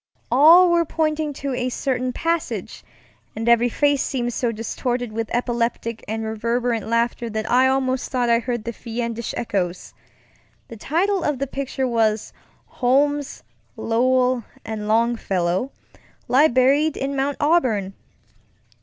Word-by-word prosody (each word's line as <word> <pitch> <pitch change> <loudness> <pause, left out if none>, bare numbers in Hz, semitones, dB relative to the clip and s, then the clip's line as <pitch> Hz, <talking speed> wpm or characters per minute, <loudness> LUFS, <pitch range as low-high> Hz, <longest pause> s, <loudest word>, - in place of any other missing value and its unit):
All 335 +7 +7
were 340 0 +3
pointing 310 -1 -1
to 275 0 -4
a 250 0 -1
certain 255 0 -2
passage, 330 +4 -3 0.5
and 225 +2 -4
every 235 +1 +4
face 285 +2 +1
seemed 240 -2 -2
so 240 -1 -1
distorted 240 +2 -3
with 225 0 -4
epileptic 235 -1 -2
and 220 +1 -3
reverberant 230 +1 -1
laughter 230 +1 0
that 220 0 -3
I 255 +2 +5
almost 260 -1 0
thought 250 -2 0
I 235 0 +4
heard 240 -2 -3
the 235 +1 -5
fiendish 235 0 -4
echoes. 185 -6 -3 0.8
The 230 - -8
title 350 - 0
of 295 -2 0
the 275 - -2
picture 270 -1 -3
was, 220 -3 0 0.3
Holmes, 285 +3 0 0.3
Lowell, 250 +1 +1 0.2
and 215 -1 -5
Longfellow 215 -2 0 0.6
Lie 280 +5 +5
Buried 275 +5 +2
in 275 +1 -3
Mount 275 +1 -1
Auburn. 255 - +1
245 Hz, 135 wpm, -22 LUFS, 230-275 Hz, 0.8 s, All